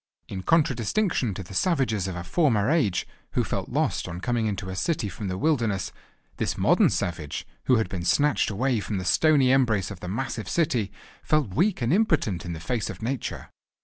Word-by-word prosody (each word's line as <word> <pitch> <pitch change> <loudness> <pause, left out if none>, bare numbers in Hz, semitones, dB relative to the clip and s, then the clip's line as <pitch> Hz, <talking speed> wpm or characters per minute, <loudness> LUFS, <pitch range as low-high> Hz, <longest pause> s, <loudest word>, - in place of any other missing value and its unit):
In 95 - -5
contradistinction 135 - +1
to 95 - -5
the 90 - -11
savages 110 - +1
of 95 - -4
a 85 - -5
former 120 - +2
age, 130 - +1 0.3
who - - +2
felt - - -3
lost - - 0
on 85 - -5
coming 115 +2 0
into 95 -2 -3
a - - -5
city 150 - -1
from 100 +2 -6
the 90 0 -2
wilderness, 115 - 0 0.5
this - - -1
modern - - +4
savage, 80 -4 -3 0.2
who 130 - +4
had 110 -4 +1
been 90 -1 -5
snatched 145 +11 +2
away 120 +3 0
from 105 0 -3
the 95 - -4
stony 140 - +4
embrace 110 -8 +2
of 95 - -8
the 90 - -7
massive 110 -1 -3
city, 130 - +1 0.3
felt 150 -11 +1
weak 180 - +1
and 120 +6 +2
impotent 160 - +1
in 85 - -4
the 80 - -6
face 115 +6 -2
of - - -7
nature. 125 +1 -4
110 Hz, 195 wpm, -26 LUFS, 95-140 Hz, 0.5 s, modern